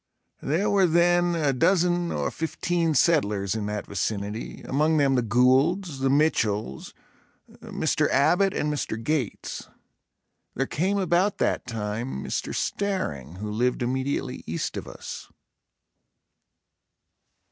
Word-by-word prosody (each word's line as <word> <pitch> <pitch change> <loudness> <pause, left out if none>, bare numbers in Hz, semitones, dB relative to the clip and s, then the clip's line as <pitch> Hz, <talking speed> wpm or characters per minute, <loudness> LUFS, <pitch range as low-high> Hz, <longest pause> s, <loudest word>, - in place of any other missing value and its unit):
There 165 +9 0
were 200 -3 +4
then 175 +1 +3
a 150 -4 +1
dozen 175 +4 +2
or - - -1
fifteen 165 0 -1
settlers 105 - +2
in 110 -2 -3
that 105 0 -3
vicinity, 100 +2 -4
among 155 +3 +1
them 140 -2 +3
the 125 - +3
Goulds, 135 - +2
the 135 0 +1
Mitchells, 110 - 0 0.7
Mr. - - 0
Abbott 180 +8 +3
and 150 -5 -1
Mr. 140 -6 -3
Gates. 140 -3 -3 0.9
There 135 - 0
came 185 +9 0
about 190 +1 +2
that - - 0
time, 110 - -4
Mr. - - -3
Staring, 90 - -2
who 105 +3 -5
lived 125 +3 0
immediately 130 +3 -2
east - - -3
of - - -5
us. - - -8
140 Hz, 120 wpm, -25 LUFS, 110-175 Hz, 0.9 s, were